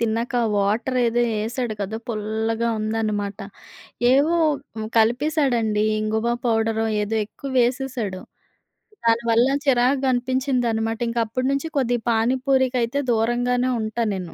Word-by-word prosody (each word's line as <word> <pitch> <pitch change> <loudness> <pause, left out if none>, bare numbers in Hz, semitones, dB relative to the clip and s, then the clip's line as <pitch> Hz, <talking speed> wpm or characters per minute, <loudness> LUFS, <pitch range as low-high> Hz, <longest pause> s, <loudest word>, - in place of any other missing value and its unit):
తిన్నక 230 +2 -1
ఆ - - +1
వాటరేదో 235 +4 +1 0.2
ఎసాడు 230 +1 -3
కదా! 205 +2 -3
పుల్లగా 220 +1 -1
ఉందనమాట. 215 -2 -2 0.7
ఏవో 295 +6 +3 0.4
హ్మ్, 215 0 -4
కలిపేశాడండీ, 240 -3 +2 0.2
ఇంగువ 220 +2 0
పౌడరో, 225 -1 +1 0.2
ఏదో 220 +2 -2
ఎక్కువ 270 +6 -8
వేసేశాడు. 245 -6 -1 0.8
దాని 230 +1 +3
వల్ల 235 +3 +4 0.2
చిరాకుగా 260 +1 +2
అనిపించిందనమాట. 245 -3 0
ఇంకప్పుడు 230 +2 -1
నుంచి 275 +3 -1
కొద్దిగా 245 -3 0
పానిపూరికైతే 255 +2 +1
దూరంగానే 245 +2 +1
ఉంటానేను. 215 -5 -3
235 Hz, 105 wpm, -22 LUFS, 220-255 Hz, 0.8 s, వల్ల